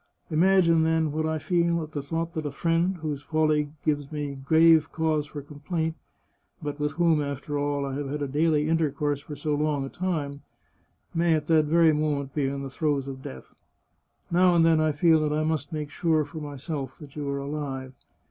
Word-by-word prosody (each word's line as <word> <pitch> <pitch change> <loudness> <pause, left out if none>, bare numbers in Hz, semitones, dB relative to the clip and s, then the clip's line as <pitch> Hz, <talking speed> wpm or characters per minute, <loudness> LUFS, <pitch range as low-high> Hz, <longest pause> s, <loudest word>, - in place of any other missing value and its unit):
Im 155 +1 +2
agine, 175 -4 +5
then, 160 -1 +1
what 155 +1 -1
I 160 0 0
feel 170 +1 +1
at 155 - -9
the 145 - -3
thought 165 +4 -3
that 155 -2 -3
a - - -4
friend, 170 +5 +1
whose 150 -3 -3
folly 155 -1 +1
g^ves 145 -2 0
me 145 -2 -3
grave 160 +3 +4
cause 155 -2 0
for 145 -1 -7
complaint, 160 +3 -3 0.6
but 145 -1 -5
with 150 0 -1
whom, 165 -1 +3
after 145 +1 -3
all, 145 -1 -1
I 135 - -4
have 140 0 -3
had 140 -2 -3
daily 150 0 +2
intercourse 150 -3 0
for 150 0 -8
so 150 +1 -2
long 145 -2 0
a - - -6
time, 150 -6 -3 0.7
may 165 -1 +3
at 150 -1 -2
that 155 -1 +4
very 165 +1 +4
moment 145 -2 -1
be 145 -3 0
in 140 0 -3
the 135 - -6
throes 145 -2 -1
of 135 -1 -7
death. 65 - -10 0.8
Now 180 +1 +4
and 165 -1 +5
then 160 -1 +4
I 155 0 +2
feel 160 +2 +4
that 150 -1 0
I 155 +1 +1
must 155 -3 -1
make 150 -2 -4
sure 160 -1 +1
for 145 +2 -8
myself 145 -2 -5
that 145 -3 -13
you 145 -2 -3
are 140 - -1
alive. 140 -2 -4
150 Hz, 205 wpm, -26 LUFS, 145-160 Hz, 0.8 s, agine